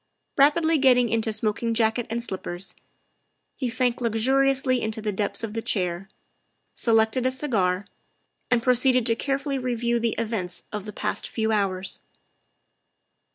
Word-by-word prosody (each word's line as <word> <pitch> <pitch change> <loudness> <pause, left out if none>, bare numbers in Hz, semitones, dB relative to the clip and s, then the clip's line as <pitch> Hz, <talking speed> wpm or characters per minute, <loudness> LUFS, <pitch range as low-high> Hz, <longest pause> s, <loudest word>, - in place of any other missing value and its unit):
Rapidly 315 +3 +4
getting 250 -3 +4
into 225 0 0
smoking 215 +2 -1
jacket 225 +1 +1
and 235 +1 -2
slippers, 185 -3 -5 0.8
he 255 -3 -2
sank 250 0 0
luxuriously 260 +3 +2
into 220 0 -2
the 215 -1 -2
depths 205 +3 -1
of 215 -2 -4
the 225 - -2
chair, 185 -2 -1 0.6
selected 225 +2 +2
a - - +1
cigar, 205 -9 0 0.6
and 245 -2 +2
proceeded 250 0 +3
to 230 - +3
carefully 275 +2 -2
review 240 -1 0
the 230 -1 0
events 215 -6 -3
of 210 -2 -5
the 210 - -6
past 210 +1 -2
few 220 -1 -1
hours. 195 -3 0
230 Hz, 140 wpm, -25 LUFS, 210-255 Hz, 0.8 s, Rapidly